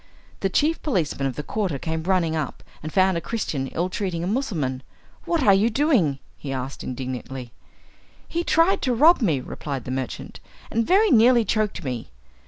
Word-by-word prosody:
The 195 - 0
chief 305 - +1
policeman 165 - 0
of 130 - -4
the 150 - -4
quarter 190 -4 -2
came 160 +3 -3
running 170 -2 +1
up, 150 -4 -4 0.2
and 155 - -6
found 190 -1 +3
a - - -2
Christian 155 - -3
ill 170 +6 -1
treating 185 -3 -3
a - - -2
Mussulman. 165 - -1 0.4
"What 335 -4 +1
are 200 - +6
you 205 +4 +4
doing?" 235 - +2 0.2
he 140 - -5
asked 130 0 -4
indignantly. 130 -1 -5 0.8
"He 340 +1 -2
tried 335 +3 +3
to 255 -2 +1
rob 310 +6 +6
me," 160 - +2
replied 135 0 -5
the 130 - -4
merchant, 130 -1 -5 0.3
"and 230 0 0
very 410 +3 +4
nearly 235 0 +6
choked 215 -2 -1
me." 125 -4 -4
180 Hz, 180 wpm, -24 LUFS, -, 0.8 s, are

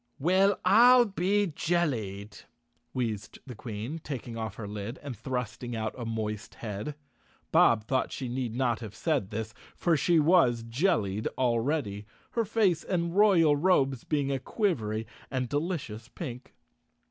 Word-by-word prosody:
"Well, 185 +6 +3
I'll 240 +6 +7
be 200 0 +1
jellied!" 125 - -2 0.5
wheezed 115 -6 -3
the 130 - -8
Queen, 115 +6 -6
taking 125 -6 -6
off 110 -2 -4
her 105 -2 -6
lid 105 +4 -5
and 140 -4 -5
thrusting 120 +1 -4
out 110 -1 -2
a 120 - -6
moist 110 -1 -4
head. 105 +6 -5 0.6
Bob 110 -2 +5
thought 130 +4 0
she 130 - -4
need 120 -2 -3
not 120 -3 +1
have 110 -2 -8
said 135 - 0
this, 110 +1 -4 0.2
for 170 -2 +2
she 165 +3 +3
was 145 -8 +4
jellied 115 - 0
already—her 120 - -1
face 195 -6 +2
and 170 -2 -1
royal 180 -8 +5
robes 140 -6 +2
being 145 -3 0
a 135 - 0
quivery 115 - -1 0.2
and 130 -2 -1
delicious 145 - -3
pink. 125 -2 -8
130 Hz, 140 wpm, -29 LUFS, 110-170 Hz, 0.6 s, I'll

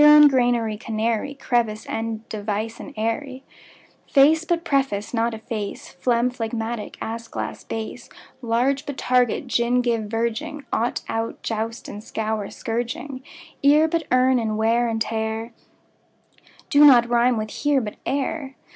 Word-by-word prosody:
Heron; 300 0 +9
granary, 240 -4 +1
canary; 225 +5 -2
Crevice, 230 -5 0
and 225 0 -4
device, 215 +1 -3
and - - -8
eyrie; 255 +5 -2 0.7
Face 305 +4 +5
but 340 -1 0
preface, 270 -9 0
but 230 -1 0
efface, 220 -2 -5
Phlegm, 235 +6 +1
phlegmatic; 225 -2 -4
ass, 230 +1 -5
glass, - - -5
bass; 225 +2 -6 0.3
Large, 255 +5 0
but 285 -2 -5
target, 250 +1 +2
gin, 245 0 +1
give, 230 -3 0
verging; 235 +7 -3
Ought, 235 +2 0
out, 225 0 -3
joust 225 +1 -3
and 205 +1 -8
scour, 220 -2 -2
but - - -9
scourging; 245 +3 -4 0.4
Ear, 295 +3 +5
but 325 -1 -1
earn; 255 0 +4
and 220 -2 -1
wear 230 +2 +2
and 225 -1 -1
tear 220 +1 -2 1.2
Do 290 +1 +7
not 245 -5 +8
rime 240 0 +3
with 215 -1 -3
"here", 290 -1 +1
but 215 -4 -5
"ere". 275 0 -2
235 Hz, 145 wpm, -23 LUFS, 220-265 Hz, 1.2 s, Heron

